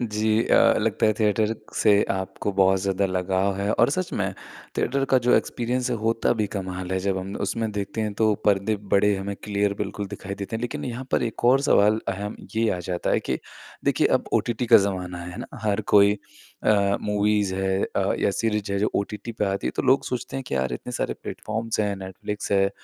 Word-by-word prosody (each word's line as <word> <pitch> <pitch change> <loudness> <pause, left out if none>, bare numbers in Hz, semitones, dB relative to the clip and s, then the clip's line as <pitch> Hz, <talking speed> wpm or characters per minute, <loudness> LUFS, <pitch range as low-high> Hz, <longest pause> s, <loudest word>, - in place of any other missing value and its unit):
जी 110 -1 +1
अ, - - +5
लगता - - +1
है 110 - +4
थिएटर 110 +1 +2 0.2
से 105 -1 +4
आपको 95 +1 -2
बहुत 95 0 +3
ज़्यादा 100 0 +1
लगाव 95 +1 0
है। 100 +1 -1
और 120 +4 +3
सच 185 +3 -2
में 95 -1 -1 0.5
थिएटर 135 +2 +1
का 130 - +6
जो 125 - +6
एक्सपीरियंस 125 +1 -1
है 120 - 0
होता 115 +2 +1
भी 110 -3 0
कमाल 95 -1 -4
है 95 - +1
जब 95 0 0
हम 95 +2 -6
उसमें 110 +2 -2
देखते 105 +2 -3
हैं 105 -1 -1
तो 110 0 +3
पर्दे 105 +1 +2 0.2
बड़े 100 +1 +4
हमें 100 +1 -4
क्लियर 100 -1 0
बिल्कुल 100 0 -3
दिखाई 100 -1 -6
देते 100 +3 -4
हैं। - - -6
लेकिन 120 - -4
यहाँ 125 +1 -5
पर - - +2
एक 115 0 -4
और 130 +3 +5
सवाल 105 +2 +4
अहम 100 +2 -3 0.2
ये 115 0 +2
आ - - -6
जाता 90 -1 -1
है - - +2
कि - - -2 0.5
देखिए, - - +3
अब - - +1
ओटीटी 120 +1 0
का 115 - +8
ज़माना 90 -3 -1
है 90 +1 -8
ना - - -8
हर 105 0 +1
कोई 100 0 +6 0.5
अ, 100 -2 +3
मूवीज़ 105 -1 +1
है 95 0 0
अ, - - +2
या - - +2
सीरीज़ 105 -1 -1
है 100 - 0
जो 105 - +1
ओटीटी 105 +3 -3
पे 110 - -1
आती 95 0 -2
है - - +1
तो - - 0
लोग 135 +2 +3
सोचते 125 +1 -4
हैं 135 - -3
कि - - -2
यार 65 -1 0
इतने - - -5
सारे - - -2
प्लेटफ़ॉर्म्स 110 +1 -3
है 105 -1 0
नेटफ्लिक्स 95 +2 -6
है, 95 0 +3
105 Hz, 215 wpm, -24 LUFS, 95-110 Hz, 0.5 s, का